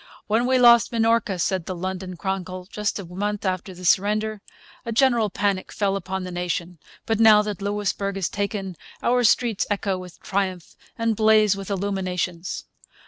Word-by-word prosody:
'When 225 Hz, +3 st, +1 dB
we 260 Hz, 0 st, +3 dB
lost 235 Hz, -2 st, +6 dB
Minorca,' 225 Hz, -4 st, +1 dB
said 180 Hz, 0 st, -1 dB
the 185 Hz, -, -3 dB
London 185 Hz, 0 st, -5 dB
Chronicle, 185 Hz, -1 st, -4 dB
just 210 Hz, 0 st, -2 dB
a 200 Hz, -, -6 dB
month 205 Hz, +4 st, -3 dB
after 185 Hz, 0 st, -2 dB
the 180 Hz, 0 st, -10 dB
surrender, 210 Hz, +3 st, +2 dB, 0.4 s
'a 230 Hz, -, -4 dB
general 235 Hz, -2 st, +3 dB
panic 200 Hz, -1 st, -1 dB
fell 200 Hz, -2 st, 0 dB
upon 190 Hz, 0 st, -4 dB
the 180 Hz, -, -6 dB
nation; 175 Hz, -1 st, -3 dB, 0.3 s
but 225 Hz, -1 st, 0 dB
now 215 Hz, -2 st, +7 dB
that 210 Hz, -2 st, -5 dB
Louisbourg 200 Hz, -1 st, -2 dB
is 190 Hz, -4 st, 0 dB
taken 200 Hz, -2 st, -3 dB, 0.3 s
our 245 Hz, +1 st, +3 dB
streets 225 Hz, -2 st, +2 dB
echo 200 Hz, -2 st, -1 dB
with 180 Hz, -2 st, -11 dB
triumph 190 Hz, -3 st, -3 dB, 0.2 s
and 230 Hz, -1 st, 0 dB
blaze 215 Hz, -1 st, +4 dB
with 195 Hz, 0 st, -7 dB
illuminations.' 185 Hz, -3 st, -3 dB
200 Hz, 165 wpm, -23 LUFS, 185-215 Hz, 0.4 s, now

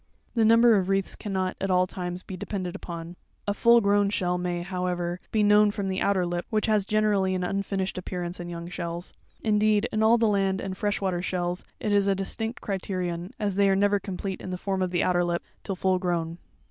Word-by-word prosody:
The 230 Hz, -, +2 dB
number 230 Hz, +1 st, +6 dB
of 190 Hz, -1 st, 0 dB
wreaths 195 Hz, -1 st, +1 dB
cannot, 190 Hz, -3 st, -2 dB
at 195 Hz, -, -1 dB
all 185 Hz, 0 st, +4 dB
times, 180 Hz, 0 st, -5 dB
be 190 Hz, -, -7 dB
depended 185 Hz, 0 st, -4 dB
upon. 170 Hz, -2 st, -7 dB, 0.3 s
A 205 Hz, -, +2 dB
full 235 Hz, +3 st, +5 dB
grown 200 Hz, 0 st, +3 dB
shell 180 Hz, -3 st, 0 dB
may, 175 Hz, -1 st, -2 dB
however, 180 Hz, -1 st, -2 dB
be 215 Hz, -1 st, +2 dB
known 210 Hz, 0 st, +6 dB
from 200 Hz, -2 st, -3 dB
the 190 Hz, 0 st, -2 dB
outer 195 Hz, -3 st, +2 dB
lip, 175 Hz, 0 st, -3 dB
which 215 Hz, -1 st, +1 dB
has 215 Hz, -3 st, +2 dB
generally 205 Hz, -3 st, +2 dB
an 180 Hz, -, -1 dB
unfinished 195 Hz, 0 st, -2 dB
appearance 180 Hz, -1 st, -4 dB
in 175 Hz, 0 st, -6 dB
young 170 Hz, 0 st, -6 dB
shells. 175 Hz, 0 st, -5 dB, 0.3 s
Indeed, 215 Hz, 0 st, +3 dB
in 215 Hz, -, 0 dB
all 225 Hz, +2 st, +5 dB
the 230 Hz, -1 st, +3 dB
land 195 Hz, -2 st, +1 dB
and 190 Hz, 0 st, -4 dB
fresh 205 Hz, +1 st, -1 dB
water 185 Hz, -3 st, 0 dB
shells, 180 Hz, -1 st, -2 dB
it 215 Hz, -, -1 dB
is 200 Hz, -1 st, +3 dB
a 195 Hz, -, +3 dB
distinct 220 Hz, +4 st, -3 dB
criterion, 180 Hz, -3 st, -3 dB
as 205 Hz, -2 st, 0 dB
they 200 Hz, +1 st, +3 dB
are 195 Hz, -, +4 dB
never 205 Hz, +1 st, +3 dB
complete 195 Hz, -1 st, -5 dB
in -, -, -6 dB
the 180 Hz, -, -3 dB
form 190 Hz, +1 st, -2 dB
of 185 Hz, -, +1 dB
the 175 Hz, -1 st, +1 dB
outer 175 Hz, -1 st, +2 dB
lip, 175 Hz, 0 st, -1 dB, 0.2 s
till 195 Hz, -, -3 dB
full 185 Hz, 0 st, +1 dB
grown. 170 Hz, -2 st, -2 dB
190 Hz, 220 wpm, -26 LUFS, 180-205 Hz, 0.3 s, number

